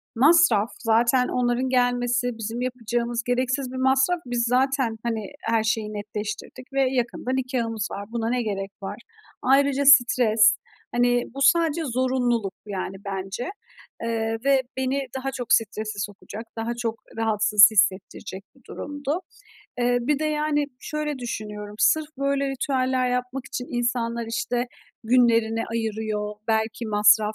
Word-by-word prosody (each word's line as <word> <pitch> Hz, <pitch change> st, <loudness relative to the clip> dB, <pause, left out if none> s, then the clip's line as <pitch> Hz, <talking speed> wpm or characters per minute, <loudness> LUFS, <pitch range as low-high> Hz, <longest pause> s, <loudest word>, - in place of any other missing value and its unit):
masraf. 265 Hz, -5 st, +5 dB
Zaten 235 Hz, +3 st, +3 dB
onların 250 Hz, +1 st, 0 dB
gelmesi 245 Hz, -1 st, +1 dB
bizim 225 Hz, +2 st, -4 dB
yapacağımız 240 Hz, -1 st, -2 dB
gereksiz 255 Hz, +1 st, -1 dB
bir 260 Hz, -, -6 dB
masraf. 265 Hz, +6 st, +2 dB
Biz 245 Hz, -1 st, -1 dB
zaten, 255 Hz, -2 st, +1 dB
hani, 225 Hz, -3 st, -2 dB
her 225 Hz, -1 st, +1 dB
şeyi 220 Hz, -1 st, -1 dB
netleştirdik 210 Hz, +5 st, -6 dB
ve 270 Hz, -1 st, +2 dB
yakında 245 Hz, 0 st, -2 dB
nikâhımız 245 Hz, -5 st, -1 dB
var, 200 Hz, +1 st, -5 dB
buna 230 Hz, -1 st, -1 dB
ne 245 Hz, -1 st, 0 dB
gerek 195 Hz, -2 st, -3 dB
var? 195 Hz, -, -5 dB, 0.4 s
Ayrıca 275 Hz, +1 st, +3 dB
stres. 240 Hz, -5 st, +6 dB, 0.4 s
Hani, 245 Hz, 0 st, +3 dB
bu 275 Hz, -, -6 dB
sadece 330 Hz, +2 st, +4 dB
zorunluluk 245 Hz, -5 st, 0 dB
bu, 210 Hz, -, -14 dB
yani, 190 Hz, 0 st, -4 dB
bence. 195 Hz, -, -4 dB, 0.5 s
Eee, 225 Hz, -1 st, -1 dB
ve 275 Hz, -1 st, +4 dB, 0.2 s
beni 265 Hz, +1 st, 0 dB, 0.2 s
daha 270 Hz, +1 st, -3 dB
çok 245 Hz, -3 st, -1 dB
strese 215 Hz, -2 st, 0 dB
sokacak, 205 Hz, +2 st, -6 dB
daha 225 Hz, +1 st, -2 dB
çok 230 Hz, -2 st, -3 dB, 0.2 s
rahatsız 210 Hz, -1 st, +6 dB
hissettirecek 195 Hz, -2 st, 0 dB
bir 265 Hz, -, -23 dB
durumdu. 290 Hz, +4 st, -4 dB, 0.6 s
Eee, 245 Hz, 0 st, +2 dB
bir 280 Hz, +4 st, 0 dB
de, 310 Hz, -, -2 dB
yani, 300 Hz, -1 st, 0 dB
şöyle 300 Hz, -2 st, -3 dB
düşünüyorum, 210 Hz, -3 st, -6 dB
sırf 315 Hz, -1 st, +3 dB
böyle 275 Hz, 0 st, 0 dB
ritüeller 260 Hz, -2 st, 0 dB
yapmak 250 Hz, +1 st, -3 dB
için 250 Hz, -1 st, -5 dB
insanlar, 235 Hz, -1 st, -1 dB
işte, 240 Hz, +2 st, -1 dB, 0.4 s
günlerini 230 Hz, -2 st, +3 dB
ayırıyor, 215 Hz, -2 st, -2 dB
belki 220 Hz, +1 st, 0 dB
masraf 210 Hz, 0 st, +4 dB
240 Hz, 135 wpm, -24 LUFS, 220-260 Hz, 0.6 s, stres